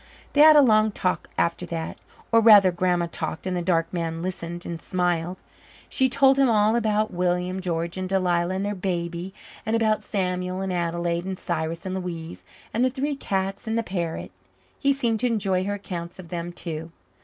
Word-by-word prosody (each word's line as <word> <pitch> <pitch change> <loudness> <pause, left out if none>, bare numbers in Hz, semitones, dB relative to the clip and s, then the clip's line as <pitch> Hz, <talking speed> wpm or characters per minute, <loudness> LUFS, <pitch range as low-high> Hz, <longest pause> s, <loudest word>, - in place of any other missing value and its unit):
They 290 - +5
had 310 0 +9
a 295 - +8
long 215 -3 +4
talk 185 -2 -2
after 170 +1 0
that 165 -1 -4 0.4
or, 230 - +6
rather, 210 -4 +8
Grandma 175 0 +1
talked 160 +1 -4
and 185 -1 -1
the 175 - -1
dark 170 -1 0
man 165 -1 -3
listened 175 -1 -5
and 170 -1 -5
smiled. 180 -1 -1 0.5
She 260 0 +2
told 270 +1 +4
him 270 -2 +5
all 215 0 +3
about 215 -2 +1
William 180 +1 0
George 170 -1 -2
and 185 0 -3
Delia 180 -3 +1
and 190 +2 -2
their 205 - -1
baby 175 -1 -3 0.3
and 220 - 0
about 220 -2 +2
Samuel 180 -1 -2
and 190 -1 -2
Adelaide 170 0 -1
and 190 -1 -4
Cyrus 165 +1 -3
and 185 - -3
Louise 165 - -5 0.3
and 235 - +1
the 255 - +4
three 280 +3 -2
cats 195 -4 -3
and 220 +1 0
the 230 - +1
parrot. 175 -5 -4 0.5
He 280 - +3
seemed 235 -5 0
to 250 - +1
enjoy 195 -5 0
her 205 +1 -1
accounts 175 -4 -6
of 180 -3 -11
them 175 -1 -4
too. 165 -1 -6
185 Hz, 190 wpm, -25 LUFS, 170-215 Hz, 0.5 s, had